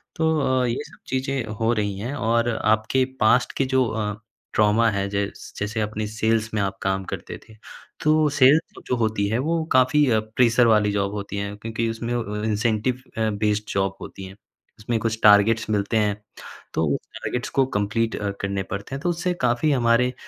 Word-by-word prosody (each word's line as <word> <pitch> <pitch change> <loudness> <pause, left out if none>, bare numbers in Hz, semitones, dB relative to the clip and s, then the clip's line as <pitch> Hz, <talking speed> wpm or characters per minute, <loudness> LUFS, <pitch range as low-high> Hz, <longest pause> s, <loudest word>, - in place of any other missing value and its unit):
तो 160 -1 +1 0.2
अ, - - +1
ये 120 +1 -2
सब - - -17
चीज़ें 130 -1 -2
हो 115 0 +2
रही 105 -3 -1
हैं। 120 +7 -4
और 115 -2 +1
आपके 110 +4 +2 0.2
पास्ट 120 +3 +3
के 135 - +2
जो 130 0 +2
अ, 110 -2 -2 0.4
ट्रॉमा 110 +2 +3
है 100 -1 -1
जैस 100 0 -4
जैसे 105 +2 -2
अपने 105 0 -3
सेल्स 110 +1 0
में 105 - 0
आप 95 -1 -2
काम 95 0 -1
करते - - -6
थे। 110 - -16 0.5
तो 155 0 +4
सेल्स 145 +3 +3
जो 125 - +1
होती 110 -3 0
है 110 - 0
वो 160 +4 0
काफ़ी 130 +3 +4 0.3
प्रेशर 120 -1 +4
वाली 105 -2 +4
जॉब 100 0 -1
होती 100 -1 -5
है, 100 0 -3
क्योंकि 115 +2 -3
उसमें 115 +1 -3
व 105 -3 -3
अ, - - -5
इंसेंटिव 110 +3 0 0.2
अ, 110 -1 +1
बेस्ड 105 0 -1
जॉब 95 0 0
होती 95 - -9
है। 95 +1 -11 0.4
उसमें 115 +2 -1
कुछ 110 0 -2
टारगेट्स 105 +2 +5
मिलते 105 +1 0
हैं। 105 -1 0 0.5
तो 80 - +1
उस - - -4 0.2
टारगेट्स 125 - -3
को 135 - +2
कंप्लीट 110 +3 0
अ, 105 - -2
करने 100 -1 -2
पड़ते 100 +7 -6
हैं 135 - -6
तो 175 - 0
उससे 175 +1 -1
काफ़ी 125 +5 +2
हमारे 125 -1 +2
110 Hz, 190 wpm, -23 LUFS, 105-125 Hz, 0.5 s, टारगेट्स